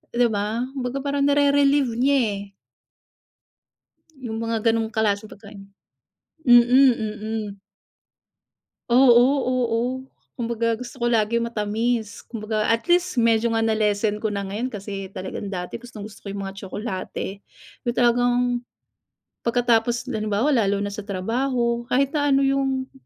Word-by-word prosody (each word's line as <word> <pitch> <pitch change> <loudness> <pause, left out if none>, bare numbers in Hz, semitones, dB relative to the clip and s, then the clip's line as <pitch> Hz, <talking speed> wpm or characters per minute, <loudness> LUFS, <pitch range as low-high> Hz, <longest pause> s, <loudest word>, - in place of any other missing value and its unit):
'Di 240 0 +4
ba? 210 +3 -1
Kumbaga 265 0 -3
parang 280 0 0
nere-relieve 285 -2 +3
niya, 275 +2 +3 0.2
eh. 200 0 -11 1.6
Yung 240 -5 -6
mga 225 -1 -2
ganong 225 0 0
klaseng 215 -1 0
pagkain, 200 -1 -13 0.8
mm, 240 -1 +8
mm. 220 -5 +1 1.3
Oo, 245 0 +6 0.2
oo, 245 -3 0 0.6
kumbaga, 230 -1 -1
gusto 250 +1 -8
ko 240 -1 0
lagi 230 +1 +2
matamis, 225 0 -2
kumbaga, 215 -2 -2
at 230 +7 0
least, 355 -5 +2
medyo 230 0 +3
nga 225 - +1
na-lessen 215 -1 +1
ko 215 - 0
na 200 -1 -3
ngayon, 225 +6 -3
kasi, 200 -2 -6
talagang 190 +1 -6
dati 180 -2 -5
gustong-gusto 220 -3 -10
ko - - -9
yung 200 -1 -5
mga 195 - -8
tsokolate, 195 0 -5 0.4
yung 240 - 0
talagang 245 0 +3 1.1
pagkatapos 240 +1 +1
halimbawa 215 +4 0
lalo 200 -6 +2
na 205 - -3
sa 200 0 -7
trabaho, 235 +4 -1
kahit 270 +2 +1
na 290 -1 0
ano 275 - +3
yung 270 -1 0
230 Hz, 130 wpm, -23 LUFS, 210-250 Hz, 1.6 s, mm